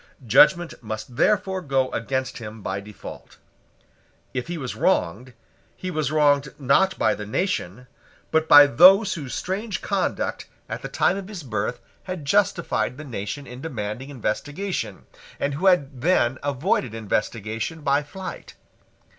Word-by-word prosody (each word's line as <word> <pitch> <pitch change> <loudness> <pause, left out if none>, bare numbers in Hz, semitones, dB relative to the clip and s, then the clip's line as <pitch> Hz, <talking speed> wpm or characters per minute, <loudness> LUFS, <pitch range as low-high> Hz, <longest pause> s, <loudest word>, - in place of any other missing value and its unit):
Judgment 160 - +5
must 110 +2 -6
therefore 190 - +2
go 135 -4 0
against 130 +2 -2
him 110 -2 -9
by 95 +1 -2
default. 100 0 -11 1.0
If 125 -1 -3
he 175 0 -4
was 130 -5 -5
wronged, 120 +9 0 0.4
he 185 - -4
was 155 -3 -1
wronged, 145 -2 +2
not 145 +8 +3
by - - +2
the 105 0 -7
nation, 125 - -2 0.5
but 160 0 +2
by 145 0 +10
those 185 - +6
whose 145 -7 -5
strange 200 +3 -3
conduct 195 -2 -1 0.2
at - - -5
the - - -6
time - - +2
of 195 -1 -6
his 200 -6 -7
birth 110 -1 -3 0.3
had 185 -5 -5
justified 185 -7 +1
the 155 - -7
nation 115 +2 -5
in 125 0 -10
demanding 125 -3 -5
investigation, 145 - -3 0.3
and 140 - -1
who 180 +8 0
had 140 -8 +2
then 130 -6 +2
avoided 140 - -1
investigation 110 +6 -3
by 140 0 +2
flight. 185 +6 -8
140 Hz, 145 wpm, -24 LUFS, 120-180 Hz, 1.0 s, by